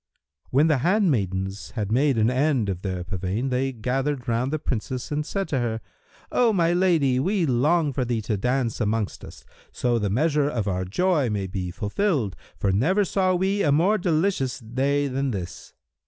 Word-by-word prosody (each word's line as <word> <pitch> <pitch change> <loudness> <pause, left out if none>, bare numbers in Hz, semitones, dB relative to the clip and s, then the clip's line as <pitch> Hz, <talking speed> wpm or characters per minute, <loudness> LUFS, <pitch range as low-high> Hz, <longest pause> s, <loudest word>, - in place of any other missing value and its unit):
When 140 +4 +4
the 155 -4 +3
handmaidens 105 - 0
had 105 -3 -2
made 135 +2 +2
an 110 +2 +3
end 130 -5 +1
of 90 -2 -3
their 95 -2 -3
pavane, 95 +8 -3
they 130 +2 0
gathered 130 +3 -2
round 120 +3 0
the 155 - 0
Princess 130 -2 -4
and 150 +1 0
said 195 +5 -3
to 135 - 0
her, 115 -2 -1 0.5
"O 240 -2 +3
my 175 -4 +2
lady, 165 -8 +3
we 185 +4 +1
long 145 +4 +2
for 130 - 0
thee 120 -3 -2
to 105 0 -1
dance 125 +2 -1
amongst 110 -1 -1
us, - - -12 0.3
so 120 -2 0
the 105 -2 -1
measure 145 +6 +2
of 115 -7 -2
our 95 -1 -1
joy 150 - +1
may 100 -2 -2
be 95 -1 -4
fulfilled, 115 - -1 0.2
for 100 - +1
never 175 - +2
saw 185 0 +1
we 190 +3 +1
a 145 - +3
more 180 +9 +3
delicious 165 -5 0
day 135 +5 0
than 135 +1 -1
this." 95 -7 -6
130 Hz, 185 wpm, -24 LUFS, 110-155 Hz, 0.5 s, When